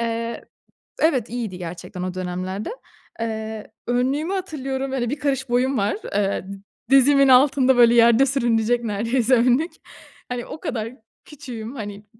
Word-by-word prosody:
Eee 230 0 -3 0.6
Evet, 265 -8 +2
iyiydi 225 -6 -4
gerçekten 180 +1 -7
o 185 0 -3
dönemlerde. 185 - -4 0.5
Eee, 220 -1 -5 0.2
önlüğümü 265 +8 0
hatırlıyorum. 275 -8 -3
Böyle 245 -3 -1
1 290 +4 -3
karış 270 -3 -1
boyum 255 +2 +1
var. 205 +1 0 0.2
Eee, 200 -2 0
di 195 0 -9 0.3
dizimin 275 +1 +5
altında 265 0 +5
böyle 235 -1 +6
yerde 235 +2 +6
sürünecek 240 -3 +1
neredeyse 230 +4 0
önlük. 250 +8 +2 0.6
Hani, 245 -1 -4
o 315 - -8
kadar 230 -5 -4 0.3
küçüğüm. 245 -4 -8
Hani, 205 -3 -7
240 Hz, 140 wpm, -22 LUFS, 220-265 Hz, 0.6 s, böyle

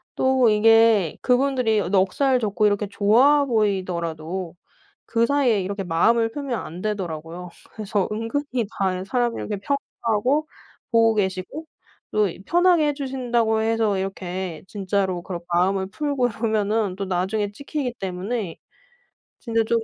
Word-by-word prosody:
또 260 -3 +3
이게 220 -4 +4
그분들이 250 -3 +2
넉살 205 +8 +2
좋고 210 -1 0
이렇게 205 0 0
좋아 240 +9 +4
보이더라도 185 - -2 0.5
그 230 0 +1
사이에 255 -6 +2
이렇게 200 +2 -3
마음을 225 +7 +2
풀면 270 -2 -3
안 170 +3 -7
되더라고요. 180 -4 -4 0.2
그래서 210 -2 -2
은근히 240 +3 -2
다른 185 -1 0
사람을 240 +3 -1
이렇게 210 - -3
평가하고 265 +2 -1 0.5
보고 225 -1 +4
계시고 190 - -2 0.5
또 210 -1 +2 0.2
편하게 350 -3 +4
해 290 - 0
주신다고 240 -5 0
해서 220 -3 +1
이렇게 185 -3 -4
진짜로 190 -3 -1
그런 175 -1 -6
마음을 190 +2 +2
풀고 280 +1 0
이러면은 215 -3 0
또 200 - -3
나중에 190 +3 -1
찍히기 280 0 -4
때문에 190 0 -3 0.8
진짜 230 -2 0
조금 230 0 +1
215 Hz, 315 characters per minute, -23 LUFS, 190-245 Hz, 0.8 s, 이게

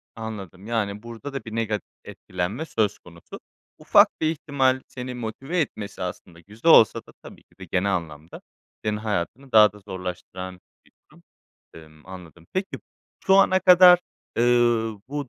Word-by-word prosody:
Anladım 100 -4 -8
yani 105 -3 -2
burada 120 +4 -9
da 135 -5 -6
bir 110 - -8
negat 110 -2 -2 0.2
etkilenme 95 - -5
söz 105 -8 -1
konusu. 85 -1 -13 0.4
Ufak - - +5
bir 155 - +1
ihtimal 135 -4 0
seni 125 0 -7
motive 130 +9 -4
etmesi 105 - -5
aslında 90 -1 -7
güzel 110 - -1
olsa 110 +1 +6
da - - -16
tabii - - -13
ki - - -33
de - - -7
genel 100 +2 0
anlamda 80 -2 -7 0.4
senin 105 0 -1
hayatını 110 +5 -4
daha 105 -2 +7
da 105 - -15
zorlaştıran 95 -1 -7 0.3
bir - - -27 0.2
durum. - - -21 0.5
Imm, 80 0 -16
anladım. 90 -3 -12
Peki 190 +1 -3 0.5
şu 190 - +5
ana 185 -1 +5
kadar, 180 -1 +8 0.4
eee, 115 - +2 0.7
bu 145 -1 -5
110 Hz, 155 wpm, -24 LUFS, 90-130 Hz, 0.7 s, kadar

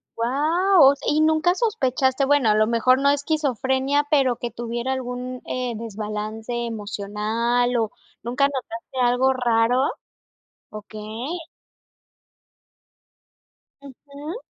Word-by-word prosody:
guau! 295 +6 +4
¿Y 305 +1 +2
nunca 315 +3 +3
sospechaste, 270 - +1
bueno, 280 -5 +3
a 210 - +4
lo 215 0 +3
mejor 255 +3 +3
no 280 0 +3
esquizofrenia, 280 -1 0
pero 265 -5 +2
que 240 -2 -5
tuviera 240 +2 -3
algún, 250 0 -5
eh, 250 -2 -3
desbalance 215 +1 -5
emocional 225 +3 -1
o 220 -2 -1 0.3
nunca 250 +4 +1
notaste 255 -2 -6
algo 250 +2 +3
raro? 240 0 +2 0.9
Okey. 215 +8 -7 2.4
Ujú. 285 - -10
250 Hz, 100 wpm, -23 LUFS, 230-280 Hz, 2.4 s, guau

